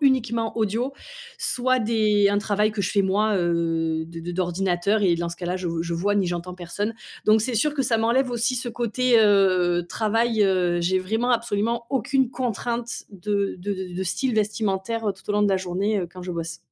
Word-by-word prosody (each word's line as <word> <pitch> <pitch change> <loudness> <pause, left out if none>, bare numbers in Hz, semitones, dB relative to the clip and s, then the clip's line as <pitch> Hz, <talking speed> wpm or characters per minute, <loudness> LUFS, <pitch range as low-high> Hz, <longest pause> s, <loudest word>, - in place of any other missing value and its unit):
uniquement 240 -5 +1
audio, 225 +5 0 0.5
soit 255 +1 +1
des 215 -3 +2
un 205 - +2
travail 210 0 +1
que 205 -2 -2
je - - -1
fais 200 - +2
moi, 205 +2 +2
heu, 165 -2 0
d 165 0 -9
d 175 +1 -5
d'ordinateur 185 +3 0
et 185 -4 +3
dans 170 0 -2
ce 170 - -7
cas-là, 175 +1 -3
je 185 -2 -3
je 170 0 -2
vois 200 +5 0
ni 195 -3 +2
j'entends 175 +1 -4
personne, 190 +5 -3 0.3
donc 215 0 +5
c'est 240 +2 -1
sûr 290 +7 +2
que 280 -2 0
ça 235 -2 +1
m'enlève 240 +4 +2
aussi 240 +2 0
ce 240 0 -3
côté, 240 +1 +1
heu, 185 -4 +3
travail, 225 +1 +1
heu. 180 -3 +2
J'ai 185 +2 +2
vraiment 220 +7 -1
absolument 235 0 0
aucune 265 0 +1
contrainte 240 -1 -3
de 200 +1 -1
de 205 +3 -4
de 190 -1 -5
de - - -9
de 190 - -1
style 235 +7 -1
vestimentaire 215 +1 -1
tout 190 - -19
au - - +2
long 210 0 +2
de 205 - +3
la 190 - +3
journée, 190 +3 -1
heu, 175 - -4
quand 185 - -10
je 180 0 -5
bosse. 165 -1 -4
205 Hz, 210 wpm, -24 LUFS, 180-230 Hz, 0.5 s, donc